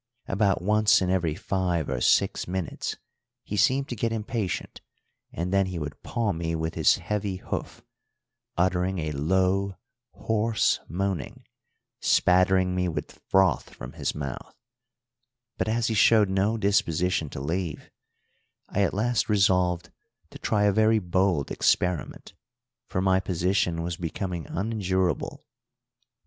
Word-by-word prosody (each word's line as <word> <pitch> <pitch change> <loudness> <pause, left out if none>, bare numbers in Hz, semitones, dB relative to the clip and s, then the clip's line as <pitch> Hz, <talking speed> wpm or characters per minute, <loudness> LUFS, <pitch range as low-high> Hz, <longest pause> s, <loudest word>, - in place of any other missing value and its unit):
About 95 -3 +1
once 105 +1 +4
in 90 -1 0
every 85 -5 0
five 90 -4 -1
or 65 -2 -2
six - - +2
minutes 90 -3 -3 0.5
he 105 - -5
seemed 130 +7 +2
to 120 - -3
get 115 +1 -1
impatient, 110 -4 -3 0.5
and 90 +3 -3
then 100 -1 +3
he 90 -2 -5
would 75 -2 -6
paw 115 -3 -1
me 85 -1 -2
with 80 0 -2
his - - +4
heavy 105 -2 -3
hoof, 90 - -6 0.7
uttering 90 +1 +1
a 80 -2 -2
low, 95 +6 +1 0.4
hoarse 110 0 +1
moaning, 95 -4 -3 0.5
spattering 90 0 +3
me 90 -1 0
with 75 -3 -6
froth 95 -1 +2
from - - -9
his - - -3
mouth; 70 -3 -6 1.0
but - - 0
as 115 +1 0
he 115 - 0
showed 105 -1 +5
no 100 +4 +1
disposition 90 -5 +1
to - - -7
leave, 80 +3 -4 0.8
I 100 - 0
at 100 - +1
last 115 +3 0
resolved 90 -4 +2 0.4
to - - -11
try 105 -2 +1
a 100 - +4
very 110 +2 +4
bold 90 -5 0
experiment, 90 -2 0 0.5
for 90 - -2
my 95 0 +3
position 90 -2 0
was 85 0 -3
becoming 85 0 -4
unendurable. 95 - -1
95 Hz, 135 wpm, -26 LUFS, 85-100 Hz, 1.0 s, showed